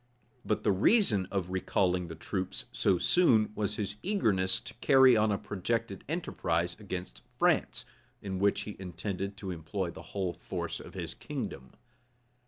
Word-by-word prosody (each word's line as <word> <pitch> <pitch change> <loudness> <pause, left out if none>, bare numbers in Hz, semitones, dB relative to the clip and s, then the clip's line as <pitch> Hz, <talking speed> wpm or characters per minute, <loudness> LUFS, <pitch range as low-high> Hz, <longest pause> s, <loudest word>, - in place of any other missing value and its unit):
[*] 120 - -38
But 105 - -1
the 105 - +4
reason 105 - +3
of 95 -2 -1
his 90 - -11
recalling 90 -1 +1
the 80 - -7
troops 95 +3 -3
so 90 - +2
soon, 110 - +4
was 105 0 -1
his 105 0 -3
eagerness 100 - +2
to - - -9
carry 130 -2 +7
on 110 -1 +3
a 100 - +1
projected 100 +1 -2
enterprise 90 - -1
against 90 - -6 0.2
France, - - +2 0.3
in 95 -2 -4
which 100 +1 +2
he 105 - -6
intended 95 +2 -4
to 95 -2 -5
employ 85 +2 -3
the - - -10 0.2
whole 95 -3 0
force - - -4
of - - -11
his - - -4
kingdom. 65 -1 -6
95 Hz, 165 wpm, -31 LUFS, 90-105 Hz, 0.3 s, carry